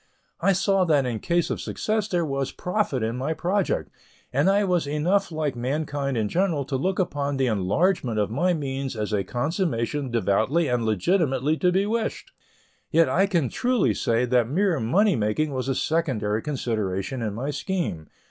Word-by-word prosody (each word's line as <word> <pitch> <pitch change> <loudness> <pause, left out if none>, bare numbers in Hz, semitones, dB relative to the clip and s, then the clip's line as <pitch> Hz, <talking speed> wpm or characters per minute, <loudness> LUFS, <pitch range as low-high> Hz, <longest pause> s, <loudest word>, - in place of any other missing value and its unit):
I 195 - +3
saw 195 0 +2
that 145 -5 +3
in 120 -3 -2
case 170 +4 0
of - - -3
success 215 -1 -1
there 175 -4 0
was 135 -2 -2
profit 180 - -1
in 115 +2 -2
my 140 +5 -2
project, 200 - -1 0.4
and - - +3
I 200 +1 +3
was 180 -6 +1
enough 175 +7 +1
like 155 -4 -2
mankind 140 +1 -2
in 110 -2 +1
general 165 - 0
to 135 - -3
look 185 +8 0
upon 145 -6 -1
the 135 - +2
enlargement 120 - +1
of 105 0 0
my 175 +10 +1
means 135 -3 -3
as 105 -1 -3
a 100 -2 +1
consummation 140 - -1
devoutly 120 - +1
and 125 -2 0
legitimately 145 - +1
to 180 +1 +2
be 190 +2 +2
wished. 230 - -2 0.6
Yet, 165 0 +4
I 195 +3 +3
can 170 -9 +1
truly 235 - +1
say 115 +4 +1
that 120 -2 +2
mere 180 +1 +1
money 195 - +3
making 115 +8 0
was 130 0 -2
a 135 - +1
secondary 120 -11 0
consideration 115 -4 -2
in 105 -3 -2
my 135 +6 -2
scheme. 145 - -3
145 Hz, 175 wpm, -25 LUFS, 120-180 Hz, 0.6 s, Yet